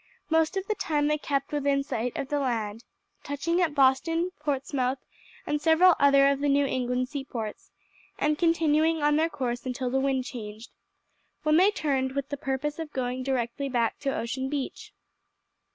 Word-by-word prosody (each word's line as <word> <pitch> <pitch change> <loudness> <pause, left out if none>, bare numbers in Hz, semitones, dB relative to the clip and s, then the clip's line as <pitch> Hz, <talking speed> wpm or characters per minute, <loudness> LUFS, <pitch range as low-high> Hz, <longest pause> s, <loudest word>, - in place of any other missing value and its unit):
Most 320 +3 +2
of 385 - -2
the 430 - 0
time 300 -7 0
they 300 0 +1
kept 275 -2 -2
within 280 -1 +1
sight 245 -3 -3
of 275 - -4
land, 230 -6 -1 0.4
touching 335 +5 -1
at 320 -4 +1
Boston, 305 +6 +2
Portsmouth, 275 -3 -1 0.5
and 295 0 -1
several 330 +4 +6
other 275 -1 +6
of 275 - -1
the 290 0 +1
New 280 0 +3
England 250 -1 -1
seaports, 255 -6 -6 0.5
and 300 0 +1
continuing 320 -1 +2
on 295 0 +4
their 320 +2 +2
course 245 -5 -3
until 255 -1 -3
the 265 - +2
wind 265 -1 0
changed, 220 -2 -8 0.7
when 305 0 +4
they 375 +4 +6
turned, 270 -9 -1
with 280 0 -3
the 285 - -2
purpose 275 +3 -3
of 320 -2 -5
going 255 0 -2
directly 260 +1 -2
back 235 -3 0
to 280 - -2
Ocean 260 +3 -3
Beach. 285 -2 -5
275 Hz, 170 wpm, -27 LUFS, 255-300 Hz, 0.7 s, several